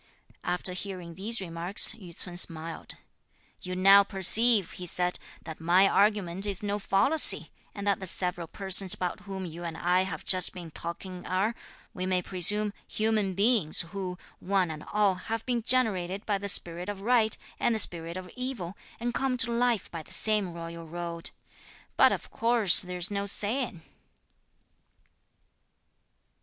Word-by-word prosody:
After 180 +1 -3
hearing 180 -2 -7
these 215 +7 0
remarks 175 +2 +2
Yü 180 -7 -11
ts'un 180 -2 -2
smiled. 165 -2 +1 0.7
"You 180 0 -6
now 195 +2 +6
perceive," 205 +2 +5
he 180 - -8
said, 180 +1 -1 0.2
"that 160 -1 -9
my 180 +4 +4
argument 200 -2 +1
is 200 0 -4
no 205 0 -2
fallacy, 210 +11 +4 0.2
and 200 - -6
that 200 -1 +1
the 190 - -7
several 175 -1 -2
persons 190 +1 +1
about 180 -1 -4
whom 195 -1 -7
you 170 0 -8
and 165 -1 -6
I 180 +1 +1
have 190 0 -5
just 185 -2 +3
been 170 -3 -9
talking 180 +3 -7
are, 195 +5 0 0.4
we 185 0 -4
may 185 -1 0
presume, 205 +4 +1
human 215 -3 -1
beings, 200 -6 +4
who, 185 -2 -5 0.2
one 185 -3 0
and 155 -1 -8
all, 205 -2 +2
have 220 +5 -6
been 245 -2 -1
generated 205 -6 +1
by 205 -2 -1
the 200 +1 -1
spirit 175 0 0
of 200 -1 -6
right, 225 -1 +2 0.2
and 235 - +1
the - - 0
spirit 170 -4 -1
of 185 -1 -8
evil, 250 -8 -5 0.2
and 240 +1 -3
come 265 -1 -1
to 235 - +4
life 235 -3 0
by 165 - -6
the - - -17
same 210 -4 0
royal 170 0 -8
road; 170 0 -6 0.7
but - - +5
of - - -5
course 230 -6 +4
there's 180 0 -2
no 200 0 -3
saying." 210 -3 -2
190 Hz, 160 wpm, -28 LUFS, 175-210 Hz, 0.7 s, now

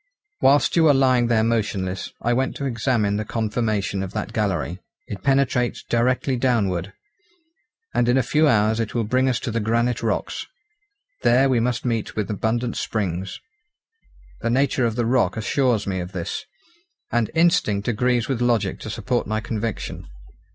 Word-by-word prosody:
"Whilst 145 +2 +4
you 165 -1 +5
were 145 -3 +6
lying 130 -3 +3
there 115 -2 +2
motionless, 100 -5 -1
I 120 - +2
went 130 +2 0
to 140 - -4
examine 115 -4 0
the 110 - -1
conformation 110 -3 -1
of 95 0 -5
that 110 - -4
gallery. 95 -4 -1 0.3
It 100 - -7
penetrates 135 -3 +1
directly 125 +2 +1
downward, 105 -7 0 1.0
and 120 - +2
in 125 - +4
a 130 - +3
few 155 +5 +3
hours 110 -2 +3
it 115 0 -3
will 115 - +1
bring 130 +4 +1
us 120 -2 0
to 120 - -3
the 115 - -1
granite 115 +2 0
rocks. - - -2 0.7
There 125 +3 +4
we 125 -3 +3
must 120 +1 -1
meet 115 -3 -2
with 105 0 -2
abundant 115 +3 -1
springs. 95 -3 -3 1.0
The 115 - -1
nature 130 0 +2
of 110 - -3
the 120 -1 0
rock 125 0 +2
assures 115 -1 +1
me 95 -2 -2
of 90 +1 -6
this, 85 -3 -4 0.7
and 120 -2 +1
instinct 160 - +2
agrees 120 0 +1
with 130 -3 -2
logic 115 -6 +1
to - - -7
support 120 +4 -2
my 110 0 -1
conviction. 110 +1 -4
115 Hz, 165 wpm, -23 LUFS, 105-125 Hz, 1.0 s, were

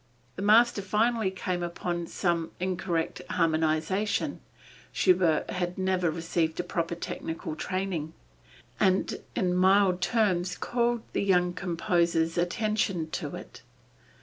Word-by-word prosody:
The - - -6
master 220 +1 +5
finally 215 +2 +1
came 185 -1 -3
upon 175 0 -3
some 170 -3 -1
incorrect 180 -2 -2
harmonization 160 +5 0 0.5
(Schubert 180 -4 +2
had 180 -1 -2
never 185 -2 +1
received 165 0 -1
a - - +1
proper 170 -1 -2
technical 160 -2 -5
training) 180 -3 -3 0.7
and 190 0 +1
in 180 -2 +1
mild 185 0 +4
terms 185 -4 +1
called 240 -1 0
the - - 0
young 180 -2 +2
composer's 170 -2 0
attention 180 -2 0
to - - -4
it. - - -10
180 Hz, 115 wpm, -28 LUFS, 170-195 Hz, 0.7 s, master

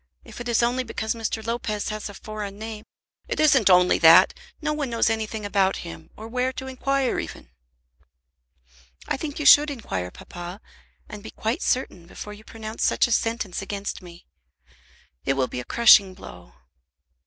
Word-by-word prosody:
If - - -10
it 240 - -5
is 235 0 +2
only 250 +2 +1
because 220 -2 -3
Mr. 225 -1 -4
Lopez 225 -3 -2
has 215 0 -5
a 200 - -10
foreign 210 -2 -7
name 220 0 -7 0.2
" - - -43
"It - - -3
isn't 295 -10 +5
only 180 0 +5
that; 165 0 +7 0.3
no 300 -1 -1
one 295 -3 -3
knows 230 -1 +1
anything 220 -1 -3
about 195 -1 +1
him, 80 -1 -10
or 220 - -8
where 250 +2 -1
to 265 - -7
inquire 265 0 -1
even." - - -8 1.6
"I - - 0
think 290 +1 -6
you 300 - -3
should 295 +1 +8
inquire, 95 - -4
papa, 175 - -9 0.5
and 210 - -9
be 220 - -9
quite 220 +3 -3
certain 185 -9 -2
before 210 +3 -9
you 210 +1 -14
pronounce 220 0 -6
such - - +3
a 240 - -4
sentence 225 -5 -1
against 200 +1 -5
me. 175 -1 -14 1.0
It 135 - +1
will 135 -1 +1
be 125 - -6
a - - -5
crushing 200 - +6
blow." 90 - -13
220 Hz, 175 wpm, -24 LUFS, 195-240 Hz, 1.6 s, should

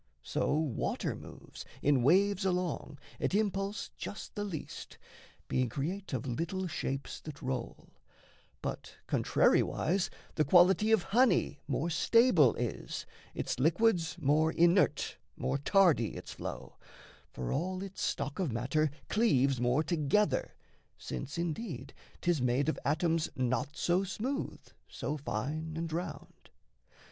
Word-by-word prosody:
So - - 0
water 150 -6 -1
moves, - - -11 0.2
In 140 -3 +4
waves 195 - +4
along, 180 -6 -1 0.2
at - - 0
impulse 200 -1 -1
just 205 - -7
the 205 - -3
least 180 -7 -6 0.5
Being 130 -2 +1
create 175 - -4
of 130 -4 -2
little 165 +9 -2
shapes 135 -5 -3
that 150 -2 -8
roll; 130 -2 -4 0.7
But, - - -5
contrariwise, 180 +3 +2 0.2
the 155 - +2
quality 185 +7 +5
of 220 -5 +4
honey 215 - +3
More 150 +5 -1
stable 170 - +5
is, 120 -2 -4 0.3
its - - -2
liquids 170 - +2
more 155 +2 +3
inert, 175 +3 +3 0.2
More 140 - -1
tardy 165 - +3
its - - -8
flow; - - -7 0.5
for 65 - -5
all 185 +6 -2
its 195 -1 -7
stock 140 +5 -2
of 175 -8 0
matter 135 +7 +1 0.2
Cleaves 135 - +2
more 125 +5 +2
together, 160 0 +1 0.4
since, 130 - -6
indeed, 165 - -4 0.3
'tis 175 -5 +1
made 125 +4 +2
Of - - -2
atoms 160 +2 +1
not 130 +3 -1
so 180 +2 +2
smooth, 245 +9 -3 0.3
so 150 - -4
fine, 150 +6 -3
and 165 -1 -3
round. 165 -3 -6
160 Hz, 125 wpm, -32 LUFS, 135-190 Hz, 0.7 s, quality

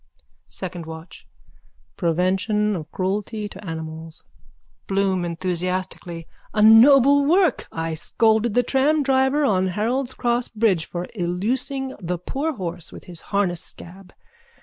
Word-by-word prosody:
_ - - -39 0.3
SECOND 175 -3 -5
WATCH: 160 +1 -10 0.7
Prevention 190 +5 +1
of 155 -4 -7
cruelty 205 +3 -2
to 200 0 -12
animals. 160 -2 -7 0.6
BLOOM: 195 -2 +1
A 180 +1 -3
noble 275 +5 +7
work! 355 +4 +2
I 165 0 -3
scolded 220 +6 +1
that 245 -1 +3
tramdriver 270 0 +2
on 190 -4 +2
Harold's 245 +7 -1
cross 240 0 0
bridge 210 -7 +1
for 175 0 -4
illusing 250 +9 -2
the 180 0 -2
poor 280 - -3
horse 175 -4 -4
with - - -11
his 175 -2 -9
harness 190 -4 +1
scab. 180 +1 -11
195 Hz, 120 wpm, -22 LUFS, 175-245 Hz, 0.7 s, noble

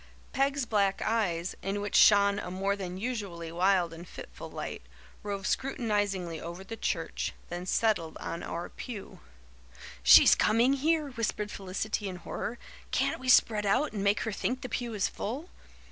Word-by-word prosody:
Peg's 275 -1 +1
black 200 -3 +1
eyes, 185 -6 0
in 195 +1 -2
which 205 0 -4
shone 200 -1 +6
a - - -5
more 195 +2 -1
than 185 -2 -5
usually 195 -7 -4
wild 180 -1 +2
and 170 +2 -10
fitful - - -9
light, - - -6 0.4
roved 200 -2 -4
scrutinizingly 205 -11 -1
over 170 +3 -7
the 225 +4 -7
church, - - -2 0.2
then 175 +1 -5
settled 185 -7 +1
on 170 - -5
our 170 +1 -4
pew. 220 -6 -8 0.8
"She's 60 +1 +9
coming 235 +5 +3
here," 300 +1 +1
whispered 215 -3 -2
Felicity 195 +2 -3
in 185 - -6
horror. 220 +6 -5 0.3
"Can't - - 0
we 260 - -4
spread 215 -4 +5
out 255 +8 +2
and 200 -2 -3
make 200 +1 +2
her 225 - -2
think 250 +5 -2
the 255 - -5
pew 230 -1 -3
is 200 - +1
full?" 275 - -5
205 Hz, 160 wpm, -29 LUFS, 185-230 Hz, 0.8 s, She's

